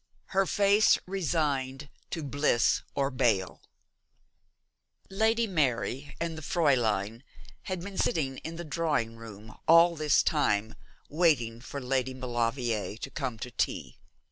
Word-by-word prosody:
'HER 195 0 +3
FACE 205 +3 +4
RESIGNED 150 -7 -1 0.2
TO 165 - -4
BLISS 140 -4 +2
OR 140 0 0
BALE.' 115 -8 0 1.5
Lady 225 +4 +2
Mary 145 - -1
and 165 -1 -2
the 160 - -7
Fräulein 120 - +1 0.5
had 185 -2 -3
been 195 +1 -6
sitting 135 -5 0
in 165 +1 -7
the 170 - -6
drawing 150 -8 -1
room 110 -1 -11
all 170 +1 +7
this 155 -2 +3
time 110 -8 +1 0.3
waiting 140 -9 +1
for 140 +2 -6
Lady 130 0 -1
Maulevrier 120 -3 -2
to 135 - -7
come 130 -6 -4
to 125 +3 -7
tea. - - -3
140 Hz, 125 wpm, -29 LUFS, 120-165 Hz, 1.5 s, all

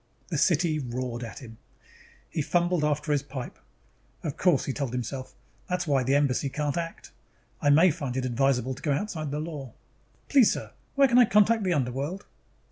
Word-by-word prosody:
The 165 - -1
city 165 -2 +2
roared 125 -2 -4
at 115 +3 -8
him. 115 -2 -12 0.7
He 155 - -3
fumbled 175 +1 +1
after 150 +1 0
his 145 -2 +2
pipe. 135 -3 -7 0.6
Of 150 -4 -3
course, 175 -7 +2
he 135 - -2
told 135 -4 -3
himself, 130 +2 -5 0.3
_that's 180 -1 -1
why 140 -4 +2
the 135 +2 +1
Embassy 140 -1 +1
can't 145 +1 -2
act. 165 -1 -5 0.5
I 145 - +3
may 165 +5 +6
find 135 -3 -4
it 130 - -1
advisable 130 0 +1
to 130 - -11
go 150 -4 +1
outside 155 -2 -3
the 145 +2 -3
law. 150 -6 -6 0.5
Please, 270 -6 +5
sir, - - -6 0.2
where 275 -1 +6
can 245 0 +5
I 245 - +8
contact 215 +2 +4
the 185 -2 +1
underworld? 140 +8 -2
145 Hz, 185 wpm, -27 LUFS, 130-170 Hz, 0.7 s, I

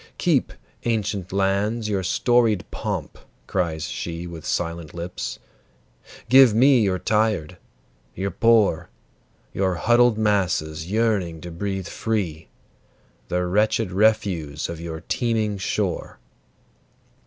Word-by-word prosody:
"Keep, - - +1 0.3
ancient 105 -5 -1
lands, 100 +4 0
your 100 -3 0
storied 115 +2 +2
pomp!" - - -4 0.3
cries 85 -5 -1
she 85 0 -5
With 85 -3 -8
silent 85 -2 -3
lips. 85 +1 -5 0.9
"Give 130 -3 +7
me 130 +1 +5
your 95 -3 +1
tired, 105 -5 0 0.6
your 95 +2 -2
poor, 115 -7 +3 0.6
Your 95 -1 0
huddled 120 +3 +4
masses 90 -7 0
yearning 105 -7 0
to 85 - -8
breathe 95 +1 -4
free, 90 -9 -3 0.8
The 90 0 -1
wretched 105 +2 +1
refuse 95 -8 +1
of 85 -1 -6
your 80 -1 -6
teeming 110 -1 -1
shore. 95 - -2
95 Hz, 110 wpm, -23 LUFS, 85-110 Hz, 0.9 s, Give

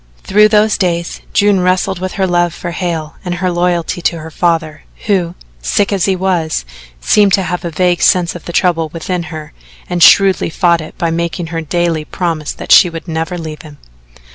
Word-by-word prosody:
Through 210 +2 +4
those 215 0 +2
days 170 -3 -2
June 205 -2 +3
wrestled 185 0 0
with 185 0 -4
her 190 - 0
love 175 -2 +1
for 175 - -5
Hale 170 -3 -4
and 180 -2 -3
her 180 +1 -1
loyalty 175 0 -1
to 170 - 0
her 160 0 -9
father, 160 -2 -1 0.2
who, 180 -4 0 0.3
sick 200 - 0
as 190 -3 +1
he 195 - +1
was, 175 - -1 0.3
seemed 200 - +3
to 195 - +3
have 180 0 -3
a 170 - -3
vague 175 +1 0
sense 180 -3 +3
of 175 - -10
the - - -5
trouble 165 -2 +1
within 170 +3 -3
her 155 -1 -8 0.3
and 175 -1 -3
shrewdly 190 +1 +5
fought 170 0 +2
it 155 - -11
by 165 -1 -1
making 170 +1 -3
her 165 - -2
daily 165 -1 -1
promise 160 -2 -3
that - - -7
she 180 - +7
would 165 +1 -8
never 165 +2 -3
leave 155 -2 -7
him. 150 -3 -13
175 Hz, 195 wpm, -14 LUFS, 165-185 Hz, 0.3 s, she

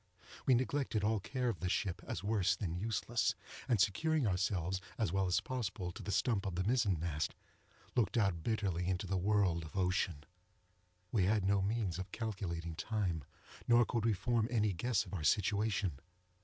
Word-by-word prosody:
We 130 - +6
neglected 130 -3 0
all 110 +1 +2
care 125 +5 -2
of 115 -7 -1
the 90 - -1
ship, 90 -1 -1
as - - -4
worse 100 -2 +2
than 90 -3 -3
useless, 110 +2 0 0.3
and 120 -5 +2
securing 140 - +2
ourselves, 95 -1 0 0.2
as 110 - 0
well 95 -1 +1
as 90 +1 +3
possible, 100 -8 -3
to - - -9
the 100 - -4
stump 100 -2 +1
of 95 - -3
the 90 - 0
mizen 105 -5 +2
mast, 75 -3 -2 0.6
looked 120 -1 +2
out 95 -7 +2
bitterly 95 -4 -1
into 95 +1 -1
the 95 +1 -1
world 95 -3 +2
of 80 +5 -8
ocean. 90 -5 0 0.9
We 100 -6 +3
had 105 0 +2
no 100 0 +3
means 100 -3 -1
of 95 0 -6
calculating 90 -7 -3
time, 90 -5 -1 0.4
nor 120 0 +6
could 115 -1 -1
we 115 - +4
form 110 +3 +1
any 105 -4 +2
guess 105 +4 0
of - - -11
our 85 -5 -3
situation. 100 -3 +1
100 Hz, 180 wpm, -35 LUFS, 90-110 Hz, 0.9 s, We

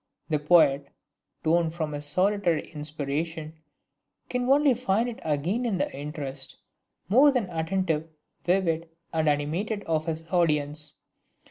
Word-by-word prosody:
The 155 -2 +1
poet, 145 -3 +4 0.6
torn 165 +1 +3
from 160 -2 -3
his 145 0 -3
solitary 185 +1 +2
inspiration, 155 +1 -4 0.7
can 250 0 0
only 285 0 +5
find 230 -1 +1
it 240 - -6
again 160 - 0
in 225 -6 0
the - - -2
interest, 140 -2 -6 0.5
more 265 +9 +6
than 250 -7 0
attentive, 165 -1 -1 0.3
vivid 170 -3 +1 0.2
and 160 -1 +2
animated 170 +9 -1
of 155 -1 0
his 165 0 -4
audience. 150 -3 +1
160 Hz, 125 wpm, -27 LUFS, 150-190 Hz, 0.7 s, more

